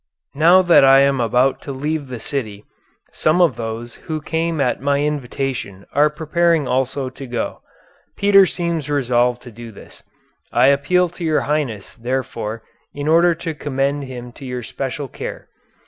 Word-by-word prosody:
Now 170 Hz, +6 st, +5 dB
that 175 Hz, -5 st, +6 dB
I 135 Hz, 0 st, +7 dB
am 140 Hz, -2 st, +2 dB
about 125 Hz, +3 st, +2 dB
to 140 Hz, -, -6 dB
leave 145 Hz, +2 st, -3 dB
the 125 Hz, -2 st, -6 dB
city, 110 Hz, -5 st, -5 dB, 0.5 s
some 155 Hz, +3 st, +1 dB
of 175 Hz, -3 st, +4 dB
those 115 Hz, +1 st, -5 dB, 0.2 s
who 155 Hz, -1 st, -1 dB
came 160 Hz, +1 st, -2 dB
at 125 Hz, -3 st, 0 dB
my 140 Hz, +1 st, +1 dB
invitation 135 Hz, -8 st, -3 dB
are 150 Hz, +2 st, +4 dB
preparing 160 Hz, 0 st, +1 dB
also 130 Hz, +1 st, -1 dB
to 135 Hz, +1 st, -9 dB
go. 120 Hz, -2 st, -4 dB, 0.6 s
Peter 195 Hz, -1 st, +6 dB
seems 170 Hz, -4 st, -3 dB
resolved 125 Hz, -3 st, +1 dB
to 125 Hz, -, -11 dB
do 115 Hz, +1 st, -10 dB
this. 100 Hz, -, -15 dB, 0.5 s
I 125 Hz, +3 st, +4 dB
appeal 160 Hz, +6 st, +2 dB
to 175 Hz, +1 st, -9 dB
your 155 Hz, -2 st, +2 dB
highness, 135 Hz, -9 st, -2 dB
therefore, 115 Hz, -3 st, -4 dB, 0.3 s
in 145 Hz, +1 st, -4 dB
order 170 Hz, +2 st, +4 dB
to 165 Hz, 0 st, -5 dB
commend 140 Hz, -1 st, -2 dB
him 125 Hz, -2 st, -8 dB
to 135 Hz, -, -14 dB
your 125 Hz, -2 st, -5 dB
special 135 Hz, +4 st, -4 dB
care. -, -, -8 dB
140 Hz, 160 wpm, -20 LUFS, 125-155 Hz, 0.6 s, I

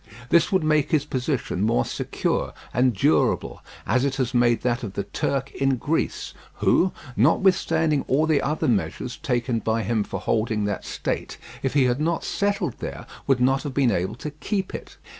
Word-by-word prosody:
This 170 Hz, -1 st, +4 dB
would 190 Hz, -4 st, +2 dB
make 155 Hz, -2 st, +2 dB
his 150 Hz, -2 st, +2 dB
position 130 Hz, -, -2 dB
more 100 Hz, -, +2 dB
secure -, -, -2 dB, 0.2 s
and 125 Hz, -1 st, +2 dB
durable, 80 Hz, -5 st, +1 dB, 0.2 s
as 130 Hz, -, +2 dB
it 140 Hz, -1 st, 0 dB
has 130 Hz, -2 st, -1 dB
made 120 Hz, -1 st, +3 dB
that 125 Hz, 0 st, 0 dB
of 105 Hz, -6 st, -5 dB
the 100 Hz, -, -2 dB
Turk 135 Hz, -1 st, -2 dB
in 135 Hz, -1 st, +1 dB
Greece, 150 Hz, +6 st, -2 dB, 0.2 s
who, 185 Hz, -, +3 dB, 0.2 s
notwithstanding 160 Hz, -, +3 dB
all 145 Hz, +4 st, +3 dB
the 155 Hz, -3 st, +2 dB
other 155 Hz, +2 st, -1 dB
measures 115 Hz, +3 st, -1 dB
taken 125 Hz, -5 st, -1 dB
by 110 Hz, 0 st, 0 dB
him 110 Hz, +1 st, 0 dB
for -, -, -5 dB
holding 110 Hz, -2 st, 0 dB
that 100 Hz, -1 st, -3 dB
state, -, -, -3 dB, 0.2 s
if 135 Hz, +1 st, -2 dB
he 140 Hz, -, +5 dB
had 125 Hz, +2 st, +1 dB
not 165 Hz, +1 st, 0 dB
settled 200 Hz, 0 st, -1 dB
there, -, -, -6 dB, 0.2 s
would 135 Hz, -2 st, +3 dB
not 135 Hz, +2 st, +3 dB
have 140 Hz, -4 st, -6 dB
been 135 Hz, -4 st, +3 dB
able 90 Hz, +2 st, -1 dB
to 150 Hz, +5 st, -6 dB
keep 190 Hz, +6 st, -3 dB
it. -, -, -8 dB
130 Hz, 180 wpm, -24 LUFS, 120-155 Hz, 0.2 s, he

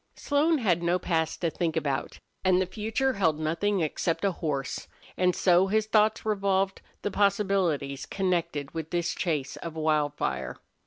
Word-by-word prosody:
Slone 305 Hz, +3 st, +2 dB
had 185 Hz, -, +1 dB
no 175 Hz, +1 st, +2 dB
past 165 Hz, -3 st, -1 dB
to 170 Hz, -2 st, +1 dB
think 165 Hz, -1 st, -1 dB
about, 140 Hz, -1 st, -2 dB, 0.3 s
and 185 Hz, -1 st, +4 dB
the 185 Hz, -, +2 dB
future 220 Hz, +7 st, -1 dB
held 165 Hz, -7 st, +1 dB
nothing 170 Hz, +5 st, 0 dB
except 165 Hz, +4 st, -1 dB
a 195 Hz, -, +3 dB
horse, 145 Hz, -6 st, -3 dB, 0.3 s
and 180 Hz, -1 st, +2 dB
so 180 Hz, +1 st, +4 dB
his 215 Hz, +2 st, +1 dB
thoughts 215 Hz, 0 st, +2 dB
revolved 195 Hz, -2 st, +1 dB, 0.2 s
the 205 Hz, -, -1 dB
possibilities 190 Hz, -9 st, +1 dB
connected 170 Hz, -7 st, -1 dB
with 160 Hz, -1 st, -4 dB
this 170 Hz, -1 st, -1 dB
chase 150 Hz, -7 st, -2 dB
of 165 Hz, -1 st, -7 dB
Wildfire. 150 Hz, -, -1 dB
175 Hz, 155 wpm, -28 LUFS, 155-200 Hz, 0.3 s, and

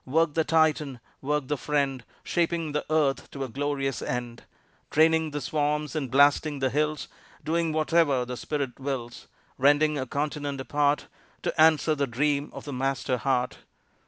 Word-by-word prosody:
Work, 160 Hz, +3 st, +2 dB
the 160 Hz, -, +2 dB
Titan; 155 Hz, -5 st, +1 dB, 0.2 s
Work, 145 Hz, 0 st, -1 dB
the 150 Hz, -, -1 dB
friend, 140 Hz, -4 st, -1 dB, 0.2 s
Shaping 170 Hz, -2 st, 0 dB
the 150 Hz, +1 st, -1 dB
earth 150 Hz, -3 st, +1 dB
to 140 Hz, -, -5 dB
a -, -, -3 dB
glorious 135 Hz, +1 st, -2 dB
end, 120 Hz, -1 st, -4 dB, 0.5 s
Draining 160 Hz, +1 st, +3 dB
the 150 Hz, 0 st, -4 dB
swamps 150 Hz, 0 st, -1 dB
and 150 Hz, -5 st, -2 dB
blasting 145 Hz, +3 st, +4 dB
the 135 Hz, -2 st, 0 dB
hills, 150 Hz, +1 st, -1 dB, 0.4 s
Doing 165 Hz, +1 st, 0 dB
whatever 155 Hz, -4 st, +2 dB
the 125 Hz, +1 st, -5 dB
Spirit 140 Hz, -1 st, -4 dB
wills 130 Hz, -3 st, -5 dB, 0.3 s
Rending 145 Hz, +2 st, +4 dB
a 130 Hz, -, -3 dB
continent 145 Hz, 0 st, -3 dB
apart, 145 Hz, +3 st, +1 dB, 0.4 s
To -, -, 0 dB
answer 160 Hz, 0 st, +5 dB
the 140 Hz, -2 st, -1 dB
dream 140 Hz, +4 st, 0 dB
of -, -, -9 dB
the 145 Hz, -, -5 dB
Master 130 Hz, 0 st, -1 dB
heart. 125 Hz, 0 st, 0 dB
145 Hz, 160 wpm, -27 LUFS, 135-155 Hz, 0.5 s, answer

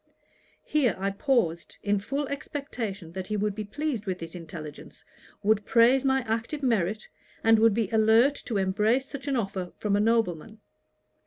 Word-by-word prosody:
Here 270 Hz, -9 st, +2 dB
I 195 Hz, +1 st, -1 dB
paused, 195 Hz, -, 0 dB
in 205 Hz, 0 st, +1 dB
full 275 Hz, +8 st, -3 dB
expectation 240 Hz, -, -5 dB
that 185 Hz, +1 st, -6 dB
he 215 Hz, -, -1 dB
would 210 Hz, 0 st, 0 dB
be 215 Hz, +1 st, -4 dB
pleased 240 Hz, -1 st, -3 dB
with 185 Hz, -1 st, -1 dB
this 165 Hz, -2 st, -8 dB
intelligence, 165 Hz, -4 st, -9 dB, 0.4 s
would 210 Hz, 0 st, +3 dB
praise 245 Hz, +5 st, +4 dB
my 265 Hz, -1 st, +2 dB
active 230 Hz, +6 st, -3 dB
merit, 215 Hz, -4 st, 0 dB, 0.4 s
and 225 Hz, 0 st, +5 dB
would 225 Hz, -2 st, +5 dB
be 225 Hz, -3 st, +1 dB
alert 225 Hz, +5 st, +5 dB
to 220 Hz, -, -2 dB
embrace 210 Hz, +7 st, +1 dB
such 280 Hz, 0 st, -8 dB
an 275 Hz, -, +1 dB
offer 195 Hz, -6 st, -3 dB
from 205 Hz, -1 st, 0 dB
a -, -, +2 dB
nobleman. 220 Hz, -2 st, 0 dB
220 Hz, 165 wpm, -27 LUFS, 195-250 Hz, 0.4 s, and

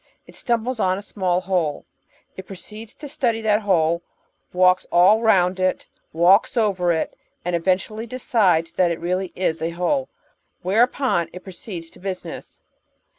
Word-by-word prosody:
It -, -, -16 dB
stumbles 235 Hz, 0 st, -1 dB
on 185 Hz, -2 st, +1 dB
a 200 Hz, -, -7 dB
small 185 Hz, -3 st, -1 dB
hole. 180 Hz, -6 st, -1 dB, 0.5 s
It 190 Hz, -, -9 dB
proceeds 215 Hz, +3 st, -10 dB
to 295 Hz, -, -9 dB
study 240 Hz, -5 st, -1 dB
that 215 Hz, -1 st, +2 dB
hole, 170 Hz, -4 st, +2 dB, 0.5 s
walks 180 Hz, 0 st, +3 dB
all 190 Hz, +6 st, +5 dB
round 190 Hz, -4 st, +3 dB
it, 185 Hz, 0 st, 0 dB, 0.3 s
walks 185 Hz, -, +4 dB
over 190 Hz, -6 st, +2 dB
it, 160 Hz, -1 st, -2 dB, 0.3 s
and 175 Hz, 0 st, 0 dB
eventually 190 Hz, +6 st, -1 dB
decides 205 Hz, -9 st, +1 dB
that 180 Hz, -2 st, +2 dB
it 170 Hz, -, -3 dB
really 180 Hz, +2 st, -1 dB
w 180 Hz, -3 st, 0 dB
a 165 Hz, -, -1 dB
hole, 260 Hz, +10 st, 0 dB, 0.5 s
whereupon 215 Hz, -, +1 dB
it 180 Hz, -, -9 dB
proceeds 180 Hz, -3 st, -9 dB
to -, -, -18 dB
business. 190 Hz, -1 st, -7 dB
185 Hz, 150 wpm, -22 LUFS, 175-220 Hz, 0.5 s, all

